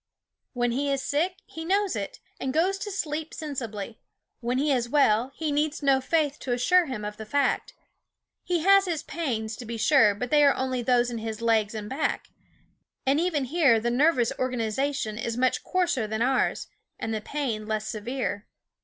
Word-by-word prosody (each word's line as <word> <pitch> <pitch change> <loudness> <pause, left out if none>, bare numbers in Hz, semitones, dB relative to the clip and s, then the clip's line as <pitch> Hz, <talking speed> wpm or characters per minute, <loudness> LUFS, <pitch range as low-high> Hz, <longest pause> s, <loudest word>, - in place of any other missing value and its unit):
When 240 -1 0
he 280 +3 0
is 275 -1 -1
sick 335 +7 0
he 320 - -8
knows 390 +3 +1
it, 200 -2 -5 0.2
and 265 - -2
goes 375 +5 +2
to 415 - -4
sleep 315 -5 -3
sensibly; 235 -8 -5 0.4
when 245 +1 -1
he 290 +2 +1
is 240 -3 +1
well 250 -3 +3
he 315 -2 -2
needs 295 +1 -1
no 270 -1 +4
faith 300 +1 0
to 250 - -2
assure 345 +8 +3
him 225 -6 -4
of 210 0 -5
the 220 - -7
fact. 285 - 0 0.7
He 350 -2 0
has 395 +3 +6
his 330 -4 -2
pains, 230 -12 -3
to 250 - -7
be 230 0 -5
sure, 225 -4 +5
but 250 +4 -4
they 295 -1 +5
are 280 - +5
only 260 -1 -1
those 245 0 +2
in 235 - -4
his 220 -1 -5
legs 225 -2 +1
and 210 -1 -5
back; 280 +5 -2 0.8
and 275 +3 +3
even 325 -5 0
here 275 -5 +4
the 240 +2 -1
nervous 255 -2 +3
organization 250 -1 -1
is 230 0 -3
much 255 0 +1
coarser 345 -11 0
than 220 +2 -1
ours, 265 +1 +1 0.3
and 225 - -3
the 215 - -2
pain 230 -5 -3
less 215 0 -2
severe. 215 -1 -3
260 Hz, 190 wpm, -26 LUFS, 225-300 Hz, 0.8 s, has